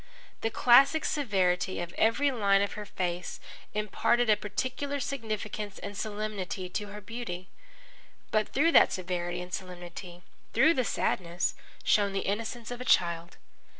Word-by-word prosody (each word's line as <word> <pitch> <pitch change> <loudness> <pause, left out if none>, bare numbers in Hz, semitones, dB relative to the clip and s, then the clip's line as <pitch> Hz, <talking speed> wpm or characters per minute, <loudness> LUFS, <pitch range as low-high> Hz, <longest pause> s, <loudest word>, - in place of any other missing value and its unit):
The 225 - +1
classic 275 +7 +5
severity 190 -9 +1
of 175 0 -5
every 275 +6 +3
line 200 -5 +3
of 200 - -2
her 210 -1 -7
face 180 -2 -3 0.4
imparted 220 +3 +2
a - - +6
peculiar 255 +7 -3
significance 215 -6 -4
and 205 - -7
solemnity 205 -4 -4
to 205 +3 -3
her 205 +1 -8
beauty. 195 -4 -6 0.8
But 215 -1 +1
through 315 +5 +3
that - - +7
severity 175 -1 -2
and 180 0 -9
solemnity, 180 -1 -7 0.3
through 270 +8 +5
the 255 -6 0
sadness, 175 -4 0 0.3
shone 200 -2 +3
the 195 - 0
innocence 230 +3 -3
of 245 0 -5
a - - -2
child. 170 -7 +2
205 Hz, 145 wpm, -29 LUFS, 180-235 Hz, 0.8 s, that